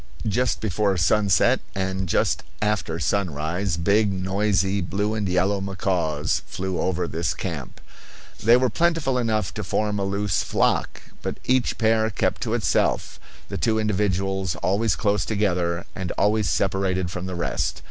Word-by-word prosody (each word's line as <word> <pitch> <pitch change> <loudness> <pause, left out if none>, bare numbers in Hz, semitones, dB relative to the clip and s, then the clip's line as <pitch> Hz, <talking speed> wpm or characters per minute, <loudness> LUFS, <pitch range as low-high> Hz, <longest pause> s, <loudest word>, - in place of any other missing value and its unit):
Just 120 +4 0
before 100 -1 +1
sunset 95 +1 +3 0.2
and 95 -1 -2
just - - +1 0.2
after 100 -6 -1
sunrise 85 0 -1
big, 100 +5 +3
noisy, 95 +1 +1
blue 100 +4 -1
and 105 -3 -1
yellow 95 +2 +1
macaws 90 -6 -1
flew 95 -1 -3
over 90 -1 0
this 85 +2 -2
camp. - - -5 0.6
They 115 +3 +7
were 130 -1 +1
plentiful 165 -7 +1
enough 110 -5 0
to 105 - -4
form 105 +2 -1
a - - 0
loose 100 -1 0
flock, - - 0 0.2
but - - -4
each 130 -1 +2
pair 110 0 +2
kept 100 - -1
to - - 0
itself, - - 0 0.3
the - - -4
two 110 -2 +2
individuals 95 -3 0
always 100 +3 +2
close 105 -1 +1
together 90 -5 0
and 95 -1 -4
always 105 0 +2
separated 95 -2 0
from 90 +1 -5
the 90 - -4
rest. 85 - -1
95 Hz, 145 wpm, -24 LUFS, 90-105 Hz, 0.6 s, They